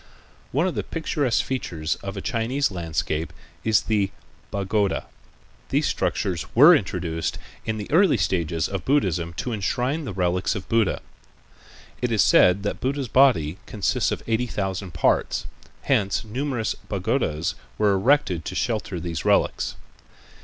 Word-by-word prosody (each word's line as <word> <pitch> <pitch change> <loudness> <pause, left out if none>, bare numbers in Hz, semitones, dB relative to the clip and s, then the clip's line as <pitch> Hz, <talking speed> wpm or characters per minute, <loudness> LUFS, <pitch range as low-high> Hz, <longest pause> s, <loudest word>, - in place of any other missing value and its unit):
One 150 +7 +2
of 185 - 0
the - - -1
picturesque 145 -6 -1
features 85 -12 -2
of 100 +1 -7
a - - -3
Chinese 120 +3 0
landscape 80 -2 -2 0.3
is 110 -2 +3
the 105 -3 +1 0.4
pagoda. 100 0 0 0.6
These - - +1
structures 90 -3 -1
were 150 +9 +9
introduced 85 - -2 0.3
in 110 -1 -1
the 105 - -4
early 175 +1 +5
stages 85 -3 0
of 95 -3 -4
Buddhism 95 - +1
to 120 +7 -3
enshrine 125 +9 -1
the 110 - -4
relics 90 +2 0
of 95 - -6
Buddha. 115 -4 +1 1.0
It 125 - +1
was 110 -4 +3
said 90 +2 +5
that 100 - -3
Buddha's 135 -1 -1
body 100 - +4
consisted 100 -3 0
of - - -17
eighty 115 +2 +1
thousand 95 -4 -3
parts, - - +1 0.4
hence 100 +2 +1
numerous 125 0 -2 0.2
pagodas 90 - 0 0.2
were 105 -2 +3
erected 95 - +2
to 95 - -5
shelter 110 -6 -1
these 85 -2 -4
relics. - - +1
100 Hz, 140 wpm, -24 LUFS, 90-125 Hz, 1.0 s, were